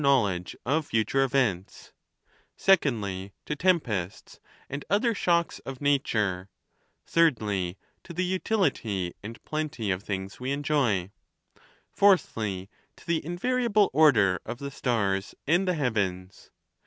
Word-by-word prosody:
knowledge 105 -11 +2
of 150 +4 0
fature 115 +5 +1
events; 120 -9 -1 0.6
secondly, 105 - +1
to 150 - -2
tempests, 130 - -1 0.3
and 140 +1 -5
othei" 220 +3 +2
shocks 170 -3 +1
of 135 -1 -8
nature; 105 -10 0 0.6
thirdly, 105 - +1 0.3
to - - -11
the 180 +2 -1
utility 180 - 0
and 115 +3 -8
plenty 155 -9 -2
of 95 0 -1
things 95 -1 -5
we 130 +2 -3
enjoy; 140 -10 0 0.8
fourthly, 110 - +2 0.3
to - - -18
the 170 -2 0
invariable 210 - +1
order 115 -12 +5
of - - -6
the 140 +2 -6
stars 100 -7 -1
and 175 +6 +2
the 180 - +2
heavens. 100 - -2
130 Hz, 115 wpm, -27 LUFS, 100-160 Hz, 0.8 s, order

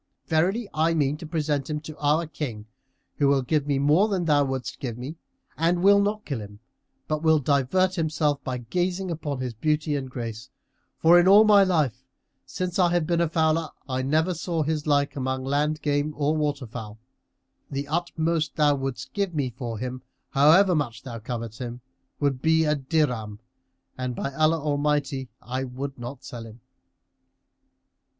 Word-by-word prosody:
Verily, 185 +8 +1
I 160 +2 +2
mean 145 -2 +1
to 160 - -8
present 150 -3 -1
him 150 0 -2
to 155 0 -9
our 150 +3 +2
King, 140 -9 -5 0.5
who 145 - +3
will 140 -1 +3
give 145 +2 0
me 140 -2 +1
more 150 +9 +4
than 190 -5 -1
thou 145 -2 +4
wouldest 135 -2 -4
give 120 -4 -4
me 130 +6 -6 0.4
and 175 +2 +1
will 200 +1 +6
not 210 +1 -1
kill 135 -7 -3
him, 105 0 -10 0.5
but 155 -1 -1
will 160 -1 +4
divert 145 +7 +2
himself 155 -4 0
by 130 -1 -3
gazing 180 +9 -2
upon 145 -5 -4
his 125 -2 -3
beauty 150 +5 0
and 135 -2 -3
grace, 115 -1 -6 0.5
for 170 +2 +6
in 175 - +4
all 205 +3 +8
my 205 -2 +6
life, 150 - 0 0.4
since 185 0 -3
I 180 -1 +5
have 175 -2 +1
been 170 +1 +1
a 170 - +1
fowler, 160 0 +1 0.2
I 130 -1 -1
never 155 +7 +1
saw 165 -1 -2
his 155 0 -2
like 145 -1 +2
among 130 -1 -2
land 145 +3 0
game 145 +1 0
or 150 +1 +1
water 145 -3 -1
fowl. 110 -2 -8 0.7
The 140 +1 -4
utmost 165 0 -1
thou 150 -2 +4
wouldst 135 -3 -4
give 200 -4 -1
me 135 -4 -1
for 120 -2 -5
him, 125 +2 -5 0.3
however 165 +7 +6
much 130 -6 -2
thou 120 -3 -7
covet 115 0 -5
him, 120 -1 -6 0.4
would 140 -3 0
be 160 0 +3
a 150 - +3
dirham, 130 -8 -1 0.6
and, 125 -1 -2
by 140 - -3
Allah 155 +2 +2
Almighty 145 -3 0
I 130 +2 -3
will 135 +2 -5
not 120 +1 -8
sell 115 -2 -8
him!" 110 +2 -13
145 Hz, 175 wpm, -25 LUFS, 130-160 Hz, 0.7 s, all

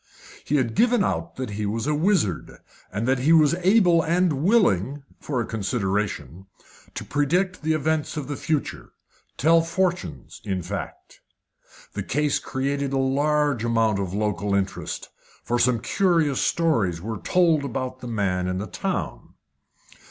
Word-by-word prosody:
He 150 - -1
had 125 -5 +1
given 240 - +3
out 170 -1 -2
that 130 -4 -5
he 105 0 -3
was 110 +3 -2
a 150 - +1
wizard, 155 - 0 0.3
and 105 +4 -2
that 130 0 +2
he 140 +6 +2
was 155 -3 +5
able 180 -3 +5
and 165 -3 +1
willing 145 - +2 0.2
for 135 -4 -3
a 115 - -1
consideration 95 - -2 0.5
to - - -5
predict 180 +6 0
the 160 +1 +1
events 155 0 -1
of 150 - -4
the 145 - -3
future 150 +1 -3 0.4
tell 165 +3 +4
fortunes, 175 +1 -2
in 95 -4 -3
fact. 100 +3 -7 0.7
The - - -3
case 150 +1 0
created 140 +1 -2
a - - +1
large 145 -1 +1
amount 115 -3 +1
of 95 -3 -3
local 105 -1 -1
interest, 100 -1 -3 0.3
for 120 0 -1
some 120 0 +3
curious 160 - +1
stories 115 - +1
were 110 +3 -5
told 165 - +2
about 130 -1 -4
the 125 - -8
man 95 -5 -1
in 90 0 -2
the 100 - -3
town. 75 - -4
135 Hz, 150 wpm, -24 LUFS, 105-160 Hz, 0.7 s, was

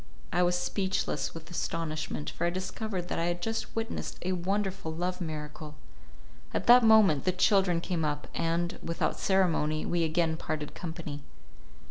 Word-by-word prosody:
I 175 - +3
was 175 0 +3
speechless 190 0 -1
with 165 +1 -9
astonishment, 155 -3 -3
for 170 - -1
I - - +3
discovered 185 +1 -4
that - - -2
I 165 - +1
had 175 0 -1
just 225 +5 -3
witnessed 225 +1 -3
a 185 - 0
wonderful 190 -1 -1
love 180 +3 -3
miracle. 150 -1 -6 0.8
At - - 0
that 245 +1 +8
moment 215 -10 +6
the 185 - +2
children 185 -1 +3
came 175 -2 -1
up, 150 -1 -2
and, 170 +1 -1
without 170 - -1
ceremony, 165 -5 +2
we 175 -1 +1
again 160 0 +1
parted 155 -2 -4
company. 160 -4 -6
175 Hz, 155 wpm, -30 LUFS, 160-190 Hz, 0.8 s, that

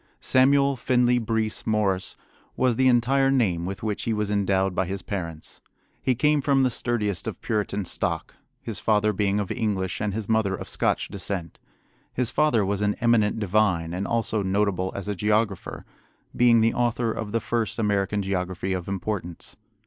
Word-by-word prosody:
Samuel 140 +1 +3
Finley 125 -1 +2
Breese 110 -1 -2
Morse 100 -4 0 0.4
was 125 -2 +2
the 130 +2 +3
entire 130 +2 +3
name 95 -11 +1
with 95 +2 -6
which 105 -2 -2
he 115 - 0
was 105 -1 -1
endowed 95 -2 +1
by 95 0 -1
his 95 0 -4
parents. 85 -6 -6 0.4
He 130 - +1
came 150 +3 +2
from 135 -1 +3
the 130 - +2
sturdiest 105 -6 -1
of - - -5
Puritan 105 -2 -1
stock, - - -3 0.3
his 115 - -5
father 105 -1 +2
being 100 +1 +1
of 100 -2 -3
English 105 -7 -2
and 105 -1 0
his 105 0 -4
mother 110 -4 +1
of - - -8
Scotch - - 0
descent. 95 -3 -4 0.5
His 125 -2 -1
father 140 -9 +2
was 100 +1 -1
an 105 0 +1
eminent 115 -3 +2
divine, 95 -5 +1
and 95 +2 -3
also 115 -2 0
notable 95 -1 0
as 100 - -5
a 105 - -1
geographer, 105 0 -1 0.5
being 120 -2 +5
the 115 +1 +3
author 120 -1 0
of 110 -1 -5
the 115 - +1
first 115 -1 -2
American 100 -2 0
geography 95 0 -2
of 90 -2 -4
importance. 95 -3 -5
105 Hz, 170 wpm, -25 LUFS, 95-115 Hz, 0.5 s, being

